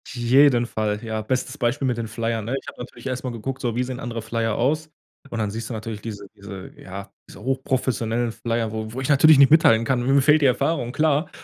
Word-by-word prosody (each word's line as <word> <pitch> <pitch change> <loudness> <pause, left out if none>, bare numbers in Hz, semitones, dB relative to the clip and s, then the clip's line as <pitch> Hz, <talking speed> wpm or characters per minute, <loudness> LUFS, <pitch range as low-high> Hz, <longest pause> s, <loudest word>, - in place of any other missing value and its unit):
Jeden 125 0 +4
Fall, 110 -1 -2
ja. 110 -1 -3
Bestes 130 +4 -2
Beispiel 130 +3 0
mit 125 -2 0
den 115 -1 -3
Flyern, 115 0 -2
ne? 120 +4 -2
Ich - - -21
habe - - -9
natürlich 125 - -10
erst 130 -1 -3
mal 130 - -2
geguckt, 125 +3 -5
so: 120 -3 -1
„Wie 125 - +1
sehen 125 0 -5
andere 120 -4 -4
Flyer 115 0 -1
aus?“, 155 +5 0 0.4
und 120 - -5
dann 105 -2 -1
siehst 115 +1 -5
du - - -4
natürlich 110 -1 -6
diese 105 -2 -7
diese 100 -1 -9
ja, 95 +1 -9 0.2
diese - - -13
hochprofessionellen 125 -3 -1
Flyer, 115 -1 -2
wo 110 0 -5
wo 130 - -4
ich 135 - -3
natürlich 150 +1 +7
nicht 140 +1 +6
mithalten 115 -8 +5
kann, 125 0 +1
mir 135 +2 +4
fehlt 150 +3 +4
die - - +3
Erfahrung, 125 -1 0
klar. 150 +2 +1
120 Hz, 230 wpm, -23 LUFS, 110-135 Hz, 0.4 s, natürlich